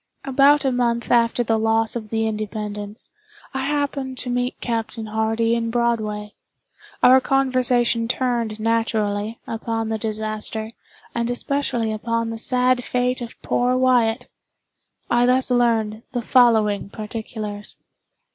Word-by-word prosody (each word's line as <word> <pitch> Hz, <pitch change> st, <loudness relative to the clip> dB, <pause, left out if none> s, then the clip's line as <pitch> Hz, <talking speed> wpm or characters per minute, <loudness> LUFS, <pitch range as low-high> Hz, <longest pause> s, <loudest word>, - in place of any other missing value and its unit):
About 280 Hz, +2 st, +4 dB
a 265 Hz, -, +3 dB
month 235 Hz, -1 st, 0 dB
after 235 Hz, 0 st, +3 dB
the 225 Hz, -1 st, +1 dB
loss 225 Hz, +1 st, +1 dB
of 220 Hz, -3 st, -5 dB
the 225 Hz, 0 st, 0 dB
"Independence," 210 Hz, 0 st, -4 dB, 0.4 s
I 265 Hz, 0 st, -2 dB
happened 280 Hz, -3 st, -2 dB
to 250 Hz, -1 st, -4 dB
meet 245 Hz, +1 st, -1 dB
Captain 225 Hz, -1 st, -3 dB
Hardy 220 Hz, +1 st, 0 dB
in 230 Hz, -1 st, 0 dB
Broadway. 220 Hz, -3 st, -1 dB, 0.7 s
Our 260 Hz, +1 st, +7 dB
conversation 255 Hz, -3 st, +2 dB
turned, 235 Hz, -3 st, -1 dB
naturally, 220 Hz, -1 st, 0 dB
upon 225 Hz, 0 st, -3 dB
the 220 Hz, -1 st, -2 dB
disaster, 215 Hz, 0 st, -3 dB, 0.4 s
and 235 Hz, 0 st, -1 dB
especially 245 Hz, -3 st, -1 dB
upon 230 Hz, +1 st, -2 dB
the 225 Hz, -, -4 dB
sad 250 Hz, +1 st, +3 dB
fate 250 Hz, +1 st, -1 dB
of 235 Hz, -1 st, -8 dB
poor 250 Hz, +1 st, +1 dB
Wyatt. 245 Hz, -2 st, +2 dB, 0.8 s
I 240 Hz, +1 st, +3 dB
thus 255 Hz, +1 st, +2 dB
learned 225 Hz, -3 st, +1 dB
the 245 Hz, -2 st, -2 dB
following 220 Hz, -5 st, +3 dB
particulars. 215 Hz, -1 st, -6 dB
230 Hz, 130 wpm, -22 LUFS, 220-250 Hz, 0.8 s, Our